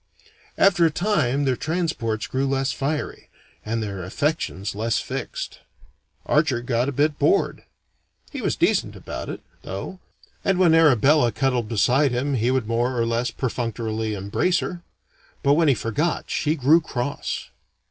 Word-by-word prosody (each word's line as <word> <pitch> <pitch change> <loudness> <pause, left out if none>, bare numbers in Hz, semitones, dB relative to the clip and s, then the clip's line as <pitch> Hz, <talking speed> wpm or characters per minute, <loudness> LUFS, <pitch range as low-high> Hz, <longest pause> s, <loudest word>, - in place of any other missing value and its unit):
After 180 -3 +4
a 165 - +5
time 155 - +1
their 130 -2 +2
transports 155 -9 -2
grew 135 +1 -1
less 135 0 0
fiery, 145 +2 -3 0.3
and 115 +1 -2
their 100 -3 -5
affections 100 - -2
less 110 +2 0
fixed. - - -5 0.7
Archer 150 -5 +2
got 120 +1 0
a - - -2
bit 145 +2 +1
bored. - - +2 0.7
He - - -5
was - - 0
decent - - +1
about - - -7
it, - - -6 0.2
though, 100 - -6 0.4
and 195 -2 +2
when 180 -3 +5
Arabella 145 -4 +5
cuddled 125 -2 0
beside 125 +5 +3
him 130 +4 -1
he 120 -1 +1
would 130 -3 +1
more 120 +2 0
or 115 - +2
less 115 +2 0
perfunctorily 115 -3 -3
embrace 100 - 0
her. 175 -1 -4 0.6
But 140 -1 +5
when 160 +1 +3
he 140 - +5
forgot, 130 +10 -2
she 155 +1 +1
grew 155 +4 +4
cross. 140 -2 -4
130 Hz, 150 wpm, -23 LUFS, 115-155 Hz, 0.7 s, a